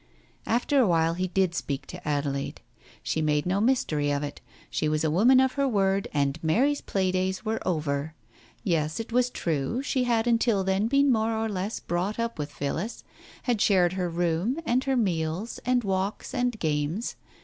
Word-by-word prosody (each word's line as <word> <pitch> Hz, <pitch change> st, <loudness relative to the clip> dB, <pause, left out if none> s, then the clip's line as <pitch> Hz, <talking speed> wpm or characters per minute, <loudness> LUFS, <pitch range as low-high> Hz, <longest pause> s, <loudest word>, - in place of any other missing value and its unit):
After 245 Hz, +5 st, +2 dB
a 245 Hz, -, +5 dB
while 165 Hz, -1 st, +2 dB
he 185 Hz, +2 st, -1 dB
did 185 Hz, -1 st, +1 dB
speak 140 Hz, -5 st, -3 dB
to 180 Hz, -3 st, -9 dB
Adelaide. 140 Hz, -2 st, -2 dB, 0.4 s
She 160 Hz, -, -1 dB
made 150 Hz, -1 st, +1 dB
no 190 Hz, +3 st, +1 dB
mystery 165 Hz, -, +1 dB
of 145 Hz, 0 st, 0 dB
it. 145 Hz, -, -6 dB, 0.3 s
She 155 Hz, -, 0 dB
was 155 Hz, +1 st, 0 dB
a 155 Hz, -, +1 dB
woman 240 Hz, +10 st, +5 dB
of 265 Hz, 0 st, +3 dB
her 280 Hz, +1 st, 0 dB
word, 195 Hz, -4 st, +1 dB
and 145 Hz, +2 st, -1 dB
Mary's 265 Hz, -, +2 dB
play 190 Hz, -2 st, 0 dB
days 190 Hz, +2 st, -1 dB
were 220 Hz, +1 st, -1 dB
over. 155 Hz, -2 st, -1 dB, 0.5 s
Yes, 160 Hz, -2 st, 0 dB
it 225 Hz, +1 st, -5 dB
was 250 Hz, +1 st, +3 dB
true, 165 Hz, -, -2 dB
she 260 Hz, -2 st, 0 dB
had 230 Hz, -2 st, +2 dB
until 230 Hz, -4 st, +2 dB
then 190 Hz, +3 st, +1 dB
been 275 Hz, +2 st, +4 dB
more 220 Hz, -1 st, +1 dB
or 225 Hz, 0 st, 0 dB
less 200 Hz, +1 st, -3 dB
brought 180 Hz, +5 st, -2 dB
up 230 Hz, -5 st, -2 dB
with 145 Hz, 0 st, -3 dB
Phillis, 160 Hz, +11 st, -4 dB, 0.4 s
had 240 Hz, -5 st, 0 dB
shared 185 Hz, -3 st, +4 dB
her 180 Hz, -2 st, -1 dB
room 175 Hz, -, 0 dB
and 255 Hz, -1 st, +1 dB
her 270 Hz, -1 st, +1 dB
meals 180 Hz, 0 st, -1 dB
and 250 Hz, -1 st, +3 dB
walks 195 Hz, +4 st, -2 dB
and 245 Hz, -3 st, 0 dB
games. 155 Hz, +5 st, -1 dB
190 Hz, 185 wpm, -27 LUFS, 160-230 Hz, 0.5 s, a